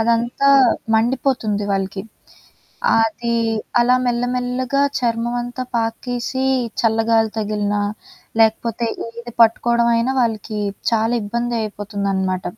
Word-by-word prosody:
అదంతా 235 +4 +2 0.5
మండిపోతుంది 230 -3 0
వాళ్ళకి. 195 0 -2 1.0
అది 230 +2 -1 0.5
అలా 250 +1 +4
మెల్లమెల్లగా 250 +2 0 0.2
చర్మమంతా 240 +1 -2
పాకేసి, 240 +3 -2 0.4
చల్లగాలి 225 0 +2
తగిలినా, 205 -1 -1 0.6
లేకపోతే 225 +1 +1 0.3
ఇది 240 0 -8
పట్టుకోవడం 235 +1 +3
అయినా 235 +3 +1
వాళ్ళకి 220 -2 -2 0.3
చాలా 225 +1 +1
ఇబ్బంది 235 +3 -2
అయిపోతుందనమాట. 200 -3 -2
230 Hz, 85 wpm, -20 LUFS, 215-240 Hz, 1.0 s, అలా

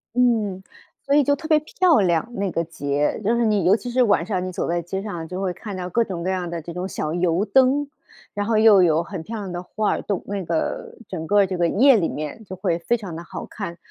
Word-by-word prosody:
嗯， 220 -6 +1 0.4
所 280 +1 +2
以 295 - +5
就 285 +2 +2
特 315 0 -8
别 310 -2 +5
漂 335 0 +2
亮， 175 +1 +2
那 195 -3 -2
个 165 - -1
节， 145 -1 -1
就 230 +4 +2
是 235 -1 +2
你 205 -5 +2
尤 195 +3 +6
其 245 +3 -5
是 250 0 +3
晚 200 -6 +2
上 185 -3 -2
你 185 - -4
走 - - -3
在 170 0 0
街 190 +3 -4
上 205 -3 -5
啊， 160 - -5
就 185 +3 -5
会 185 -2 -1
看 200 +1 -7
到 180 -1 -4
各 230 +5 +2
种 175 -5 -5
各 185 - -1
样 180 -2 -2
的 170 -1 -4
这 170 +1 -8
种 180 +2 -3
小 155 -4 -3
油 175 +3 +1
灯， 265 +6 +3 0.5
然 205 0 -2
后 225 -2 +2
又 215 -3 +7
有 165 -1 +3
很 180 -1 -6
漂 225 +6 -6
亮 195 -3 -5
的 175 0 -4
画 210 +3 -1
儿 - - -1
动 200 -3 -3
那 200 -1 -3
个 165 -1 -3
整 160 -4 -5
个 205 -1 +4
这 185 -1 -4
个 170 -1 +2
夜 260 +8 +5
里 170 - 0
面 155 +9 -6
就 185 - -7
会 170 -2 -1
非 235 +8 +1
常 190 -7 -7
地 170 - -7
好 - - -7
看。 180 -5 -7
190 Hz, 285 characters per minute, -22 LUFS, 170-220 Hz, 0.5 s, 又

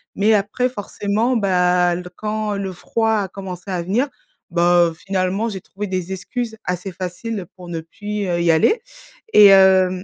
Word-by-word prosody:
mais 215 +2 +3
après 210 +5 +1
forcément, 220 +1 -1
bah, 180 -3 +2
l 180 +1 -5
quand, 215 -1 -2
le 195 -2 -4
froid 225 +5 -1
a 195 - -2
commencé 190 -1 -7
à 180 -2 -1
venir, 230 +11 0 0.4
bah 175 0 +4
heu, - - -8
finalement 190 +4 -1
j'ai 195 -4 -5
trouvé 205 +1 -6
des 185 0 -3
excuses 220 +4 -4
assez 180 +2 -3
faciles 185 +3 -5
pour 180 -2 -11
ne 165 -1 -3
plus, 205 +5 -5
heu, 170 -1 0
y 170 -1 +4
aller. 420 - +3 0.5
Et 210 - +8
hem 190 -1 +5
190 Hz, 175 wpm, -20 LUFS, 180-210 Hz, 0.5 s, Et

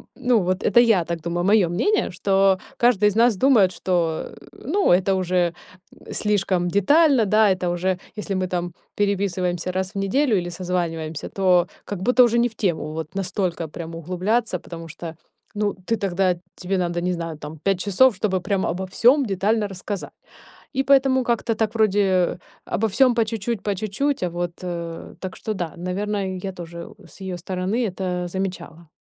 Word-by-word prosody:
ну, 250 -3 +2
вот 185 +1 -1
это 220 +4 +5
я 225 -7 +4
так 170 -1 -4
думаю. 170 +1 -2
Моё 205 -5 +4
мнение, 410 - +1
что 195 +1 +3 0.2
каждый 235 -4 +3
из 205 - -5
нас 230 -1 +4
думает 225 -8 +5
что, 170 -3 -1 0.2
э, - - -16 0.2
ну 380 +10 +1
это 190 +2 +3
уже 180 -2 +1 0.6
слишком 195 -4 0
детально, 265 - +4
да. 215 +1 +4
Это 180 -1 -3
уже 180 +1 0 0.2
если 200 -2 -3
мы 185 0 -1
там 175 -1 -3 0.2
переписываемся 185 -3 0
раз 185 +1 -3
в - - -3
неделю 220 +3 +2
или 175 -1 -2
созваниваемся, 170 -3 -3
то 185 -2 +3 0.2
как 200 -3 -5
будто 250 +4 +5
уже 235 0 +3
не 240 - +3
в - - -19
тему. 165 -6 -1
Вот 160 +2 -6
настолько 185 -3 -2
прям 165 +1 -7
углубляться, 185 +4 -1
потому 165 -1 -9
что, 165 +1 -8 0.4
ну, 205 -1 0
ты 230 - +2
тогда 185 -2 +1 0.2
тебе 190 +1 -2
надо, 175 -1 -1
не 180 +1 0
знаю, 165 -2 -5
там 150 +1 -8
5 195 +3 0
часов, 210 +5 +4
чтобы 190 -4 +1
прям 195 +1 0
обо 180 +3 -2
всём 250 +9 +4
детально 205 +1 0
рассказать. 195 +1 -6 0.6
И 270 - +2
поэтому 265 -1 +4
как-то 230 -1 0
так 220 0 -1
вроде 195 -5 +2 0.3
обо 225 +2 0
всём 255 +5 +4
по 230 -1 +2
чуть-чуть, 220 0 -3
по 205 -1 -1
чуть-чуть. 215 +6 -1
А 180 - 0
вот, 175 0 -3
э, 170 -2 -6
так 185 -1 -6
что, 215 - -3
да, 175 -5 -4
наверное, 190 +1 -2
я 195 - -3
тоже 170 -1 -8 0.2
с 195 - -17
её 190 -1 -4
стороны 190 +6 -2
это 180 -2 -3
замечала. 175 -3 -5
190 Hz, 180 wpm, -23 LUFS, 175-215 Hz, 0.6 s, это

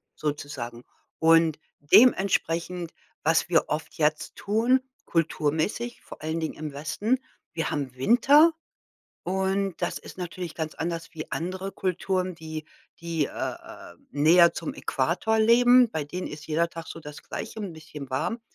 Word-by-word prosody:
sozusagen. 135 -5 -4 0.4
Und 165 -1 +5 0.2
dementsprechend 175 - +3 0.3
was 165 +1 +3
wir 165 - +4
oft 150 0 -3
jetzt 155 0 0
tun, 235 +5 +2 0.2
kulturmäßig, 165 +8 -1
vor - - -12
allen 160 +1 -2
Dingen 160 - -3
im 150 -2 -6
Westen, 180 - 0 0.4
wir 165 -1 -2
haben 135 -4 -3
Winter 275 - +6 0.7
und 190 0 0
das - - -1
ist - - -12
natürlich 175 -1 -5
ganz 160 -1 -3
anders 165 0 -4
wie 155 - -7
andere 185 +3 -3
Kulturen, 185 0 -1
die 160 -1 -6 0.4
die, 165 -3 -1
äh, - - -11
äh, 85 - -6 0.2
näher 170 +4 +6
zum 165 - -4
Äquator 175 +11 0
leben. 245 +2 +6
Bei 155 - -1
denen 180 +5 -5
ist 150 0 -9
jeder 165 +2 +1
Tag 165 -1 -8
so - - -7
das 150 -1 -10
Gleiche, 220 - -6
'n 195 -5 -5
bisschen 155 -4 -10
warm. 225 - -1
165 Hz, 145 wpm, -26 LUFS, 155-190 Hz, 0.7 s, Winter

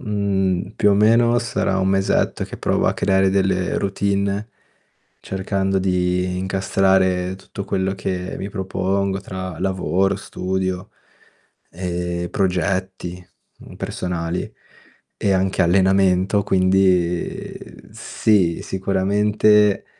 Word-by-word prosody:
Mhmm, 100 -1 -1
più 105 - +4
o 100 - +4
meno 115 +3 +4
sarà 100 -5 -1
un 95 - +1
mesetto 95 0 +1
che - - -9
provo - - 0
a - - +3
creare 95 -1 +2
delle 95 -1 +1
routine 100 +1 -1 0.7
cercando 95 0 -1
di 90 -1 0
incastrare 95 -1 +1
tutto 95 +1 -8
quello 95 0 -1
che 95 -1 -4
mi 100 - -4
propongo 95 0 -2
tra 95 -3 -6
lavoro, 95 +1 0
studio, 95 -1 -3 0.8
ehm, 85 -1 -3
progetti, 95 -1 -2 0.3
mhmm, - - -13
personali 85 -1 -4 0.6
e 100 - +1
anche 95 0 +1
allenamento 95 +2 +3
quindi 95 -2 +1 0.3
sì, 95 -6 +1
sicuramente 105 +2 +2
95 Hz, 100 wpm, -21 LUFS, 90-100 Hz, 0.8 s, più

